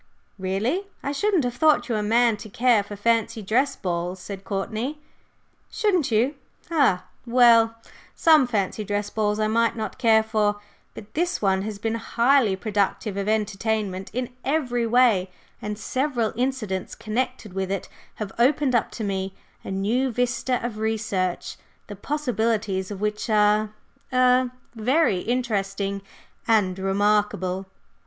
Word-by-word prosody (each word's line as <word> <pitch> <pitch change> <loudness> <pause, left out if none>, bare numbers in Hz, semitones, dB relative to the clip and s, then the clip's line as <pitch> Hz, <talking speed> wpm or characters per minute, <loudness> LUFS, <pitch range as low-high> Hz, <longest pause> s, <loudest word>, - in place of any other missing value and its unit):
"Really! 215 - -1 0.2
I 280 - -1
shouldn't 375 +2 +1
have 245 -1 -1
thought 305 +4 +3
you 240 - -1
a 215 - 0
man 230 +2 +3
to 215 - -10
care 235 0 +3
for 205 +1 -8
fancy 225 +1 0
dress 260 +8 +1
balls," 175 0 -3
said 195 +1 -8
Courtney. 220 +9 -3 0.7
"Shouldn't 400 -9 +1
you? 235 +6 +2 0.4
Ha! 275 - +3 0.2
Well, 230 -2 +5 0.4
some 310 -5 +5
fancy 215 -2 -1
dress 205 0 -2
balls 210 -1 0
I 215 - +2
might 230 +2 +2
not 220 +2 -5
care 225 -3 +5
for, 210 -2 0 0.4
but 210 0 -11
this 350 +3 0
one 190 -2 +1
has 210 0 -5
been 225 +2 -2
highly 235 -1 +2
productive 205 0 -1
of 200 +1 -2
entertainment 210 -2 -1
in 250 +2 -3
every 250 -5 0
way, 225 -6 +3 0.3
and 210 0 -4
several 255 -1 -1
incidents 235 -7 -2
connected 230 -2 -3
with 190 0 -2
it 195 -1 -3 0.3
have 210 -3 -5
opened 265 +2 +3
up 235 - +2
to 225 - -5
me 195 -1 -3 0.3
a - - -7
new 220 +7 0
vista 245 +1 0
of 220 -3 -4
research, 210 -5 -2 0.3
the 205 - -8
possibilities 220 -6 -1
of 205 -1 -7
which 210 +1 -2
are 210 0 +3 0.4
er 255 0 +4 0.2
very 240 - +2
interesting 200 -4 -2 0.5
and 195 -5 +2
remarkable." 195 -1 +1
220 Hz, 145 wpm, -24 LUFS, 200-250 Hz, 0.7 s, Well